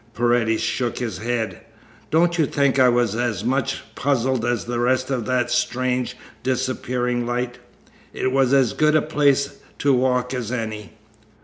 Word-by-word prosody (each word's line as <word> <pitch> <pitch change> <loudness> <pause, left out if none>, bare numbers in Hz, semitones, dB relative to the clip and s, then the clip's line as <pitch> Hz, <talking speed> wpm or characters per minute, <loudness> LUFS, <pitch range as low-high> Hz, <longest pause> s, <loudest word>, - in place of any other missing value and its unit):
Paredes 120 -1 +2
shook 120 -2 -1
his 110 -7 -4
head. 115 0 -2 0.5
"Don't 170 +2 +2
you 155 - +3
think 140 -1 +1
I 130 -1 +6
was 120 -3 +2
as 115 -5 -1
much 130 +3 -1
puzzled 130 -3 0
as 120 0 -1
the 120 0 -2
rest 130 +2 +1
by 135 - 0
that 120 +1 -1
strange, 125 0 0 0.2
disappearing 125 -1 -1
light? 120 0 -2 0.5
It 130 - -1
was 135 -1 +2
as 135 -5 +3
good 155 0 +3
a 155 - +4
place 140 -2 +1 0.2
to 140 -1 +2
walk 125 0 +1
as 120 -3 -3
any." 110 -4 -4
125 Hz, 155 wpm, -22 LUFS, 120-130 Hz, 0.5 s, I